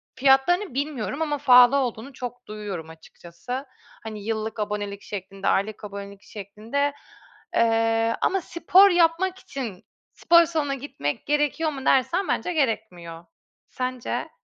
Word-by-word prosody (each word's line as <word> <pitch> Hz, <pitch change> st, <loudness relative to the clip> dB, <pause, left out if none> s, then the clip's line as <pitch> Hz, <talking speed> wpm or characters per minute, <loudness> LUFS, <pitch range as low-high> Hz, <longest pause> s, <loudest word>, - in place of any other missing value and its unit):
fiyatlarını 270 Hz, +6 st, +3 dB
bilmiyorum 275 Hz, -2 st, -3 dB
ama 295 Hz, -2 st, 0 dB
pahalı 250 Hz, -1 st, +7 dB
olduğunu 255 Hz, 0 st, -3 dB
çok 245 Hz, -1 st, -8 dB
duyuyorum 200 Hz, -6 st, -6 dB
açıkçası. 170 Hz, -, -8 dB, 0.4 s
Hani, 215 Hz, -2 st, -7 dB
yıllık 220 Hz, 0 st, -3 dB
abonelik 205 Hz, -1 st, -3 dB
şeklinde, 195 Hz, -1 st, -6 dB
aylık 210 Hz, +2 st, 0 dB
abonelik 200 Hz, -1 st, -8 dB
şeklinde. 225 Hz, +8 st, -3 dB, 0.6 s
Eee, 225 Hz, 0 st, +2 dB
ama 385 Hz, 0 st, +1 dB
spor 360 Hz, +4 st, +5 dB
yapmak 355 Hz, +1 st, +2 dB
için 245 Hz, -, -7 dB, 0.3 s
spor 340 Hz, 0 st, +5 dB
salonuna 305 Hz, -4 st, -1 dB
gitmek 245 Hz, -, -4 dB
gerekiyor 295 Hz, +2 st, +1 dB
mu 270 Hz, -2 st, -7 dB
dersen, 270 Hz, +9 st, +2 dB
bence 355 Hz, -, -1 dB
gerekmiyor. 180 Hz, -, -2 dB, 0.4 s
Sence? 255 Hz, -1 st, -4 dB
245 Hz, 120 wpm, -24 LUFS, 210-290 Hz, 0.6 s, pahalı